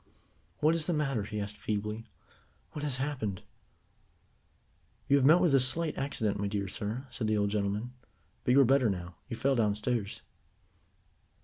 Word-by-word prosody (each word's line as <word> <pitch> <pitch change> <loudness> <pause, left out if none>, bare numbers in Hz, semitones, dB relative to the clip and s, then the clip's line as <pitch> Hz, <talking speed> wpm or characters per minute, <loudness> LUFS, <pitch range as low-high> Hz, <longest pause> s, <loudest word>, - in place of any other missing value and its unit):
"What 155 +2 +4
is 165 -2 0
the 175 - +1
matter?" 135 -7 0
he 105 0 -4
asked 105 0 -5
feebly. 105 +2 -3 0.6
"What 150 - -6
has 145 -3 0
happened?" 130 -9 -3 1.6
"You 140 - +5
have 135 - +2
met 160 +4 +7
with 175 -5 +3
a 135 - +6
slight 155 +5 +3
accident, 115 -8 -1
my 100 - -1
dear 100 -1 -2
sir," 110 +7 -3
said 110 - -3
the 110 0 +2
old 100 -1 +1
gentleman, 105 +4 -2 0.5
"but 125 - +2
you 140 - +7
are - - +6
better 130 -2 +4
now. 90 -3 -5
You 115 - -4
fell 135 +2 +2
downstairs." 105 -1 -1
115 Hz, 170 wpm, -30 LUFS, 105-140 Hz, 1.6 s, met